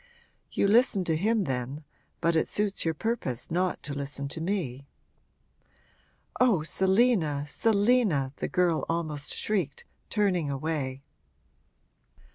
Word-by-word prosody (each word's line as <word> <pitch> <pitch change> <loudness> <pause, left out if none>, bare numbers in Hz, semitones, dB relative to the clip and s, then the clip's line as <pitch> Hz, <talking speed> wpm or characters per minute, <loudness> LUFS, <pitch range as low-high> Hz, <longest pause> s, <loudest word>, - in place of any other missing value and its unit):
'You - - +2
listen 215 -2 +4
to 165 -2 +1
him 215 +5 +1
then 135 0 -3 0.4
but 170 0 +2
it 160 - +2
suits 205 -1 +1
your 165 -1 0
purpose 160 - -3
not 180 +2 0
to 145 - -4
listen 140 0 -4
to 160 - -5
me!' 155 -8 -3 1.5
'Oh, 225 -11 +4
Selina, 190 - +2
Selina!' 205 - +2
the - - -2
girl 180 -3 +1
almost 155 -3 -2
shrieked, 185 -10 -2 0.2
turning 185 -8 +1
away. 140 -2 -3
165 Hz, 115 wpm, -28 LUFS, 145-200 Hz, 1.5 s, listen